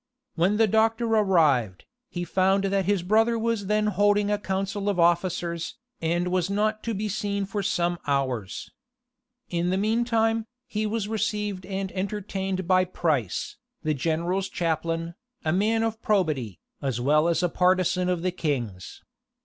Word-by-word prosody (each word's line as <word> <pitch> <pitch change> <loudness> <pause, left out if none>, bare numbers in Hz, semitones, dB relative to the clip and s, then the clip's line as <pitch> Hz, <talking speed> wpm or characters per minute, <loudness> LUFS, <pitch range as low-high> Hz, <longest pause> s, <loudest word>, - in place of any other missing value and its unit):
When 180 +5 +2
the 225 - +5
doctor 225 +2 +2
arrived, 160 - +2 0.2
he 175 -6 -4
found 190 +2 +2
that 195 -1 +1
his 200 -2 +1
brother 225 +5 +3
was 225 -3 -1
then 210 +1 +2
holding 205 0 +2
a 205 - +1
council 195 +1 -2
of 195 -3 -1
officers, 170 0 +1 0.3
and 175 +2 0
was 180 0 0
not 215 +2 0
to 230 -2 -1
be 210 +2 -2
seen 200 -1 -2
for 200 +1 -3
some 175 -3 0
hours. 130 -8 -2 0.8
In 175 0 0
the 185 - +1
mean 220 +4 +1
time, 225 -1 +1 0.2
he 215 -3 -2
was 215 -1 -2
received 210 -3 -2
and 195 -1 -3
entertained 190 -1 -3
by 185 0 +4
Price, 155 - -1 0.3
the 155 -1 +1
general's 170 +6 -1
chaplain, 165 0 -2 0.3
a 155 - +2
man 220 +4 +2
of 225 0 -2
probity, 155 - 0 0.2
as 135 -4 -1
well 150 +5 +3
as 170 +1 +1
a - - +4
partisan 180 0 +2
of 175 -2 -1
the 185 - +1
king's. 125 - -4
190 Hz, 155 wpm, -26 LUFS, 170-210 Hz, 0.8 s, the